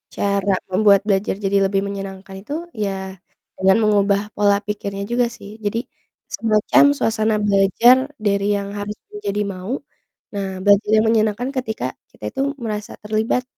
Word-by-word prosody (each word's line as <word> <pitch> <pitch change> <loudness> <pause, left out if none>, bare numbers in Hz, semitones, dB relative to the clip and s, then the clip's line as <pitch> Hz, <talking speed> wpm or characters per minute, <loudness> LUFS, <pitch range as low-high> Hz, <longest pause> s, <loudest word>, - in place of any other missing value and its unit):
cara 200 0 0 0.2
membuat 200 0 +5
belajar 195 -1 +1
jadi 200 +1 +2
lebih 195 0 0
menyenangkan 195 -1 -7
itu 280 +8 -7 0.3
ya 200 - 0 0.7
dengan 190 +2 +4
mengubah 200 -1 +3
pola 205 -1 +4
pikirnya 200 -1 -4
juga 245 0 +3
sih, 200 - -11 0.2
jadi 225 +3 0 0.6
semacam 215 +3 +3
suasana 220 -1 +1
belajar 200 +5 +5 0.3
dari 200 0 +2
yang 200 0 -3
harus 205 +1 -4 0.2
menjadi 210 0 -3
mau, 185 +5 -6 0.6
nah 200 -1 -2 0.2
belajar 205 +1 +4
yang 215 +1 +4
menyenangkan 220 +3 +1
ketika 220 - -3 0.3
kita - - -19
itu - - -3 0.2
merasa 210 -2 -4
terlibat 220 +4 0
205 Hz, 140 wpm, -20 LUFS, 200-215 Hz, 0.7 s, membuat